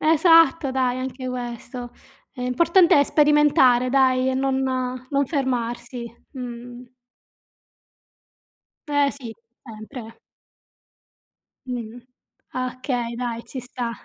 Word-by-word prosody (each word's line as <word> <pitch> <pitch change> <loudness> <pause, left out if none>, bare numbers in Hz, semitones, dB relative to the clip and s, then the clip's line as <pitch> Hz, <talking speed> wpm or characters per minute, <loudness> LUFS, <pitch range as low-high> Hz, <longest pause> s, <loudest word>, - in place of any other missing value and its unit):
Esatto, 325 -2 +5
dai 255 -1 0
anche 255 0 -5
questo. 245 0 -6 0.4
L'importante 320 +7 +3
è 285 - +5
sperimentare 290 -5 +4
dai 260 -1 +3
e 260 - 0
non 265 0 0 0.5
non 280 -1 +1
fermarsi. 240 -4 -3 0.3
Mh. 245 -1 -8 2.1
Eh 285 -1 +2
sì, 240 -5 -9 0.3
sempre. 225 +1 -10 1.5
Mh. 240 -2 -5 0.6
Okay 250 -2 -3
dai, 235 -1 -4
ci 260 - -7
sta. 245 -1 -5
255 Hz, 90 wpm, -23 LUFS, 240-275 Hz, 2.1 s, Esatto